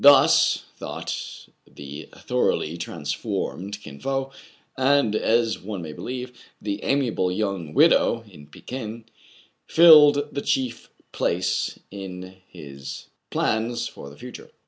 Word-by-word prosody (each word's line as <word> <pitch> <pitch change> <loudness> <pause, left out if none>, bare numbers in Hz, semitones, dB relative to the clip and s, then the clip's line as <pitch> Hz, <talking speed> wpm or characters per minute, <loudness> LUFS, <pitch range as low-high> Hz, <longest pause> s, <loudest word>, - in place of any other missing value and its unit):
Thus 140 -1 +6
thought - - -6 0.3
the 70 +2 -9
thoroughly 80 +2 -1
transformed 85 +4 -4
Kin 70 - -10
Fo; 135 - -2 0.4
and, 130 -4 +3
as 115 0 +2
one 95 -2 -6
may 80 -1 -7
believe, 125 +6 -6 0.3
the 100 0 -4
amiable 125 -9 +1
young 95 -6 -3
widow 115 -1 +4
in 75 -7 -14
Pekin 115 - -7 0.6
filled 150 -3 +7
the 140 - -2
chief 130 -4 -1 0.2
place 90 +1 0
in 95 -1 -8
his 70 -4 -9 0.2
plans 115 +2 0
for 70 - -10
the 70 - -14
future. - - -10
105 Hz, 115 wpm, -24 LUFS, 85-130 Hz, 0.6 s, filled